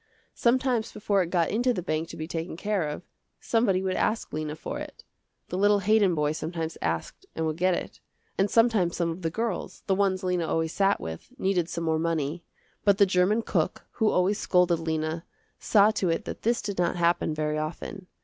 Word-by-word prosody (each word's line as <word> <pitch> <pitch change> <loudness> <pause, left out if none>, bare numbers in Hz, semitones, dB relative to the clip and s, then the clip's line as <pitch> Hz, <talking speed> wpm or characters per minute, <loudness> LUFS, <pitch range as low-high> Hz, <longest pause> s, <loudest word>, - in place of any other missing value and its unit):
Sometimes 245 -2 +1
before 200 -2 +1
it 175 - -2
got 170 -2 +1
into 245 +3 +1
the 180 - -3
bank 160 -1 -2
to - - -8
be 155 - -5
taken 165 0 -4
care 195 -5 -1
of, 150 - -6 0.4
somebody 205 -5 +1
would 190 -1 0
ask 220 +1 -1
Lena 155 0 -3
for - - -5
it. - - -9 0.5
The 180 - -2
little 205 0 +4
Haydon 205 -2 +3
boy 150 -1 +1
sometimes 160 +1 -4
asked 80 0 -3
and 160 - -1
would 155 0 -2
get 185 0 +2
it, - - -6 0.4
and 195 +1 +2
sometimes 225 -7 +3
some 170 -1 0
of 165 +3 -7
the 165 - 0
girls, 225 +2 -3
the 195 - +2
ones 190 -1 +1
Lena 180 -3 0
always 160 0 0
sat 200 0 +2
with, 80 - -7
needed 185 -6 0
some 170 - -3
more 160 -1 +1
money; 165 0 -1 0.4
but 200 -1 +4
the 200 - +6
german 190 +4 +2
cook, - - -1 0.2
who 220 - +5
always 190 +3 +2
scolded 180 -2 +3
Lena, 160 0 -2 0.4
saw 210 0 +5
to 190 -4 0
it 165 - -1
that - - -6
this 235 0 +1
did 200 -3 -4
not 175 0 +1
happen 170 -1 +2
very 155 0 -1
often. 170 +4 -5
180 Hz, 205 wpm, -27 LUFS, 160-205 Hz, 0.5 s, the